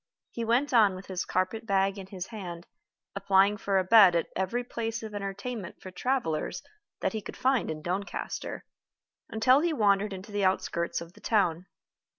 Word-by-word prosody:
He 235 - -4
went 245 +5 +1
on 210 -5 +5
with 185 +1 -9
his 185 -1 -3
carpet 220 +5 -1
bag 195 0 +1
in 190 - -8
his 190 -2 -6
hand, 180 -6 -8 0.5
applying 195 +1 +4
for 200 -1 0
a 190 - +3
bed 195 -2 +7
at 170 - 0
every 190 +7 -1
place 230 -1 -4
of 215 -1 -7
entertainment 200 +1 -5
for 185 - -9
travelers 185 - -2 0.4
that - - 0
he 220 - -3
could - - -9
find 260 -1 +1
in 155 -1 -5
Doncaster, 190 +4 -4 0.6
until 255 +5 +4
he 335 +1 +1
wandered 205 -4 +2
into 190 +2 -8
the 205 -1 -1
outskirts 180 -3 0
of 170 +1 -10
the - - -18
town. 185 -5 +1
200 Hz, 175 wpm, -28 LUFS, 185-225 Hz, 0.6 s, bed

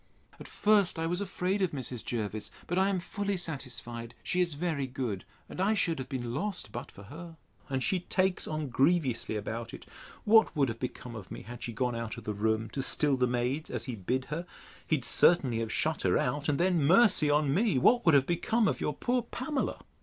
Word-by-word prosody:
At - - -9
first 205 -4 +3
I 165 - -1
was 175 +3 -1
afraid 190 0 -1
of 185 -4 +1
Mrs. 125 -4 -4
Jervis; 110 -2 -3 0.2
but 175 +2 0
I 190 +1 +3
am 195 - 0
fully 200 +2 -3
satisfied 120 -7 -5
she 180 - +1
is 170 -4 +1
very 150 -4 -1
good, 125 -8 -4 0.2
and - - -5
I 210 +3 +3
should 170 -7 +1
have 130 - -6
been 120 -4 -3
lost 180 - -3
but - - -7
for 100 - -13
her; 165 - -10 0.3
and 130 -1 -1
she 190 - +1
takes 185 +1 +1
on 155 -2 -3
grievously 135 -4 +1
about 115 +2 -4
it. - - -13 0.4
What 220 -3 +5
would 140 -4 +2
have 115 0 -5
become 125 -1 -6
of 105 -5 -9
me, - - -8
had 120 +3 -9
she 120 - -4
gone 125 +2 -1
out 115 -1 -4
of - - -8
the 105 - -3
room, 110 +2 0
to 135 - -2
still 145 +1 +2
the 125 -1 +2
maids, 125 +5 -1
as - - -3
he 130 - -5
bid 125 +7 -2
her! 170 +3 -4 0.4
He'd 145 -6 0
certainly 130 -4 +4
have 115 -1 -3
shut 160 +1 0
her 90 -1 +3
out, 145 +4 -1
and 145 - +1
then, 175 -3 +2
mercy 185 -1 +5
on 145 -1 +3
me! 200 - +2
what 240 - +4
would 165 -4 +5
have 135 -1 +5
become 215 +7 +1
of - - -1
your 150 - -1
poor 250 +7 0
Pamela? 260 +4 -3
145 Hz, 220 wpm, -30 LUFS, 120-180 Hz, 0.4 s, What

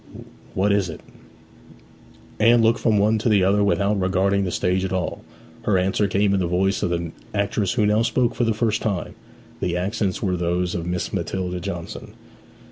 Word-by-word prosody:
'What 100 +2 +2
is 100 -3 +1
it?' 80 - -8 1.4
Anne 115 +2 +5
looked 115 +1 +3
from 110 -3 +2
one 110 +2 +3
to 115 - 0
the 100 -3 +4
other 100 +2 +3
without 100 0 +1
regarding 95 +1 +1
the - - -1
stage 90 +2 0
at 95 - -2
all. 95 -2 -3 0.4
Her 100 -3 +1
answer 95 +3 +1
came 100 +1 +1
in 100 - +2
the 90 - 0
voice 95 +3 +1
of - - 0
the 85 -1 -2 0.2
actress 100 0 0
who 110 -4 +2
now 105 +2 +3
spoke 120 +1 +1
for - - -1
the 115 -2 +1
first 110 -1 0
time. 100 -5 -2 0.5
The 90 -1 -1
accents 95 +1 -2
were 95 -3 +1
those 90 0 -1
of 85 -1 -3
Miss 90 0 -3
Matilda 90 0 -3
Johnson. 85 -2 -7
100 Hz, 190 wpm, -22 LUFS, 90-105 Hz, 1.4 s, Anne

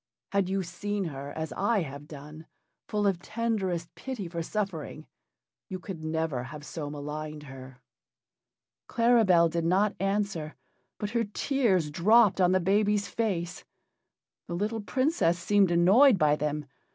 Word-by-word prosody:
Had 200 -2 +1
you 195 0 0
seen 200 +4 -3
her, 140 -4 -6
as 160 -1 -4
I 205 0 +1
have 140 0 -9
done 150 +2 -11 0.4
full 210 -1 -1
of 195 -4 +2
tenderest 195 -5 -2
pity 250 -8 -6
for 170 0 -4
suffering 165 -5 -4 0.6
you 190 - -4
could 180 -3 -8
never 155 -5 -2
have 150 +1 -9
so 150 -1 -5
maligned 150 +1 -6
her." 130 -2 -11 1.1
Claribel 225 -8 +4
did 165 0 -2
not 195 +5 +2
answer, 195 -5 -1 0.4
but 210 0 -4
her 235 -1 +1
tears 205 - 0
dropped 205 +4 +4
on 180 0 +4
the 185 - +3
baby's 205 +2 +2
face. 180 -5 -2 0.8
The 170 - -4
little 215 +4 -2
Princess 255 - +1
seemed 195 +2 +3
annoyed 195 +9 +6
by 150 -3 +3
them. 150 0 -2
180 Hz, 140 wpm, -28 LUFS, 155-205 Hz, 1.1 s, annoyed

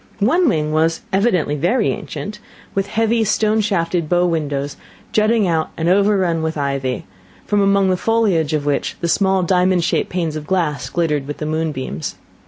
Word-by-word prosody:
One 310 - +3
wing 155 -6 0
was, 160 +1 +1
evidently 190 -7 +2
very 210 - +1
ancient, 210 0 -6 0.3
with 195 0 -1
heavy 225 +2 +1
stone 215 +1 +2
shafted 170 -5 -1
bow 175 0 +3
windows 145 -4 -2 0.4
jutting 215 -1 +2
out 160 -2 0
and 165 - -1
overrun 190 -3 +2
with 160 0 -2
ivy, 140 -3 -2 0.4
from 205 -1 +1
among 195 -1 +3
the - - +2
foliage 190 -8 +1
of 150 -2 -1
which 145 -1 -1
the 170 - 0
small 190 +1 +2
diamond 180 0 +2
shaped - - 0
panes 170 -4 -2
of 150 -1 -6
glass 150 -9 -1
glittered 150 -4 -1
with 145 - -5
the 150 - -4
moonbeams. 155 - -3
175 Hz, 170 wpm, -19 LUFS, 155-200 Hz, 0.4 s, One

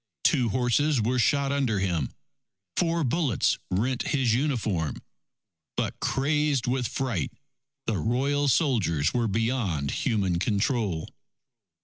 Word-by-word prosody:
Two 125 -6 +3
horses 130 +5 +2
were 120 +3 +1
shot 140 +2 +2
under 135 -7 +1
him. 90 -8 0 0.7
Four 170 -1 +1
bullets 135 - +1
rent 120 +7 0
his 130 -6 +2
uniform. 115 - -1 0.7
But - - -2
crazed 145 -1 +1
with 125 -1 0
fright, 120 - -2 0.5
the 105 -5 0
Royal 140 - +1
soldiers 110 - +2
were 120 -2 +1
beyond 105 - 0
human 95 -6 0
control. 100 - 0
120 Hz, 110 wpm, -27 LUFS, 100-140 Hz, 0.7 s, Two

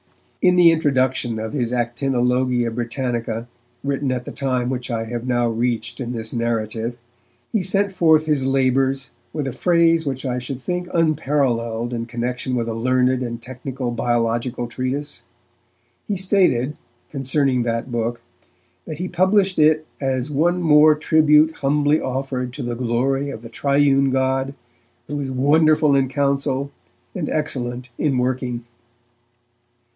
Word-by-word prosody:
In 180 0 +4
the 175 -2 +7
introduction 130 -6 +1
of 110 +3 -5
his 120 -5 -1
Actinologia 125 0 0
Britannica, 120 -1 -3 0.4
written 140 -1 -1
at 125 -1 -3
the - - -6
time 130 -2 -1
which 125 -1 -4
I 115 -2 -2
have 120 +2 -5
now 120 -1 +1
reached 115 0 -2
in 120 -2 -4
this 110 -2 -4
narrative, 115 0 -2 0.6
he 220 - +2
sent 195 +2 +1
forth 160 -4 +4
his 150 -4 +1
labours 135 0 +1 0.2
with 150 -3 -3
a 135 - -3
phrase 165 +1 +3
which 135 0 -3
I 125 -1 -1
should 125 +1 -5
think 180 +5 -3
unparalleled 130 -8 0
in 115 -1 -3
connection 125 +2 -3
with 115 -1 -1
a 115 - -2
learned 130 +2 +1
and 120 -2 -4
technical 125 +1 -5
biological 120 +1 -1
treatise. 130 +4 -4 0.9
He 205 - -1
stated, 180 - +2 0.4
concerning 135 -2 +1
that 115 +1 -2
book, 120 0 -2 0.6
that 155 - -6
he 180 +3 -3
published 190 +1 +2
it 155 0 +4 0.2
'as 135 +1 -1
one 175 +5 +1
more 155 -1 +6
tribute 155 0 +4
humbly 145 +2 +2
offered 130 -1 -3
to - - -5
the 120 0 -3
glory 130 +4 0
of 115 - -7
the 115 - -9
Triune 140 +2 +2
God, 135 +1 0 0.5
who 145 +3 -4
is 135 -2 -3
wonderful 150 +2 +3
in 135 -1 +3
counsel, 140 0 0 0.4
and 165 -5 -3
excellent 125 -4 -3
in 140 -4 +1
working'. 125 -1 -2
130 Hz, 145 wpm, -21 LUFS, 120-150 Hz, 0.9 s, the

